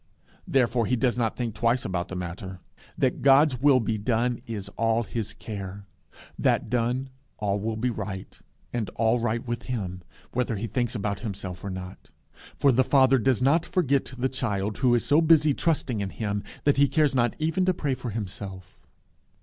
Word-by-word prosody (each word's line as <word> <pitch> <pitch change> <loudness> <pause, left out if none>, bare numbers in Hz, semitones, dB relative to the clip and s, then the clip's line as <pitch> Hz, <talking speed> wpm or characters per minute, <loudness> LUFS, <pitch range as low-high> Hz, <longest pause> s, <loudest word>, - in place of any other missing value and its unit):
Therefore 125 - +2
he 125 - +2
does 120 +1 +1
not 115 -2 0
think 120 -3 -2
twice 120 +3 +1
about 90 -1 -2
the 95 - -7
matter. 90 +1 -6 0.4
That - - +1
God's 135 -1 +5
will 140 -2 +6
be 110 -2 -1
done 120 +2 0
is 105 -4 -5
all 115 +2 +1
his 110 -1 -4
care. 100 -2 -7 0.5
That - - +1
done, 125 +2 0 0.3
all 100 -1 0
will 110 +2 -2
be 125 +3 0
right, 100 -3 -6 0.3
and 115 -4 -2
all 115 +2 +2
right 115 +1 -1
with 120 0 -3
him, 95 -7 -3 0.3
whether 125 -2 -1
he 105 +3 -3
thinks 120 +1 -1
about 100 -2 -2
himself 95 -4 -6
or 100 - -4
not. 95 0 -8 0.5
For 140 - +4
the 130 +1 +4
Father 135 -1 +4
does 125 0 +2
not 155 +5 +4
forget 140 -8 0
the 125 +2 +1
child 105 -6 -2
who 125 -2 +4
is 120 - 0
so 150 +3 +4
busy 155 -2 +5
trusting 140 -8 0
in 100 - -2
him, 100 -1 -3 0.2
that 145 -1 +3
he 140 0 +5
cares 145 +1 +2
not 120 -3 +2
even 160 +4 0
to 185 - +3
pray 140 -4 -1
for 125 -1 -5
himself. 95 -3 -7
120 Hz, 185 wpm, -26 LUFS, 100-130 Hz, 0.5 s, will